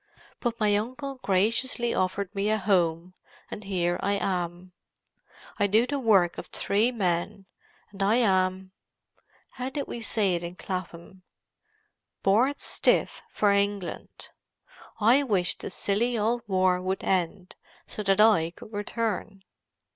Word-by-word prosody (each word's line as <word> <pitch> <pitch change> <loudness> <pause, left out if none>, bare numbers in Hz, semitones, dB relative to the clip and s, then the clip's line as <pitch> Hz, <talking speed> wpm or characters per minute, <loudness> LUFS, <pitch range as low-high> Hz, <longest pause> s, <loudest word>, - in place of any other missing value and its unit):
But 240 -2 -2
my 210 -2 +3
uncle 255 +5 -5
graciously 230 +5 +1
offered 185 +1 -1
me 200 0 -1
a 215 - +2
home, 180 -3 +1 0.4
and 210 - -7
here 180 -3 -1
am 185 -3 -2 0.8
I. - - -8
I - - +4
do 220 +4 +3
the 280 +2 -2
work 195 -8 +3
of - - -8
three 215 +5 +1
men, 195 -2 -2 0.5
and 195 -1 -9
I 200 +3 +3
am—how 190 +4 -3
did 280 +1 -4
we 235 - -7
say 205 -3 +1
it 170 - -1
in 170 +1 -6
Clapham?—bored 195 - -4
stiff - - +1
for 205 -1 +2
England. 200 -2 -2 0.7
I 235 +6 +5
wish 200 -10 +1
this - - -6
silly 230 +4 0
old 230 +3 0
war 185 -2 +2
would 190 +1 -2
end, 185 0 -1 0.3
so - - -6
that 195 -1 +1
I 210 -7 +5
could 215 - -13
return." 205 -1 -3
200 Hz, 130 wpm, -27 LUFS, 185-225 Hz, 0.8 s, I